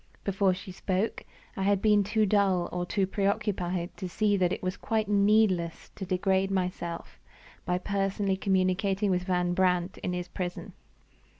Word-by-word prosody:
Before 195 -1 +2
she 185 0 -9
spoke, 190 +3 -2 0.3
I 195 - -4
had 200 0 +2
been 210 0 +4
too 215 +2 +1
dull 195 -3 +2
or 175 0 -3
too 195 0 +1
preoccupied 190 -3 -1
to 185 - -5
see 210 +2 +1
that 180 -2 +2
it - - -3
was 185 +1 -1
quite 220 -2 -1
needless 200 -4 +2
to 190 - -7
degrade 190 +1 +1
myself 180 -3 -3 0.5
by 180 0 +1
personally 195 +1 -1
communicating 190 +1 +1
with 180 0 0
Van 180 -1 +1
Brandt 180 0 +1
in 180 - -3
his 180 0 -3
prison. 180 -1 -5
190 Hz, 160 wpm, -28 LUFS, 180-200 Hz, 0.5 s, been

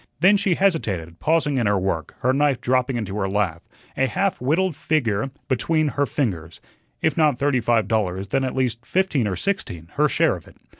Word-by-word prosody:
Then 190 +5 +6
she 200 -3 +2
hesitated, 100 - 0
pausing 150 -3 +1
in 115 - +1
her 100 0 +2
work, 90 -4 -2
her 130 +1 +2
knife 140 -2 +2
dropping 125 0 +1
into 100 -4 -4
her 95 -2 -1
lap, 95 -5 -1 0.3
a 135 - +2
half 195 - -1
whittled 160 +6 +1
figure 135 -7 0 0.2
between 155 +4 +1
her 145 +1 0
fingers. 85 - -3 0.4
If 160 - +1
not 150 -5 +3
thirty 140 -1 +1
five 115 -3 +1
dollars, 100 -3 -1
then 135 +6 +1
at 130 - -2
least 125 -3 -1
fifteen 155 - 0
or 95 - -2
sixteen, 90 - -3
her - - +4
share - - +2
of - - -12
it. - - -17
125 Hz, 195 wpm, -22 LUFS, 100-155 Hz, 0.4 s, Then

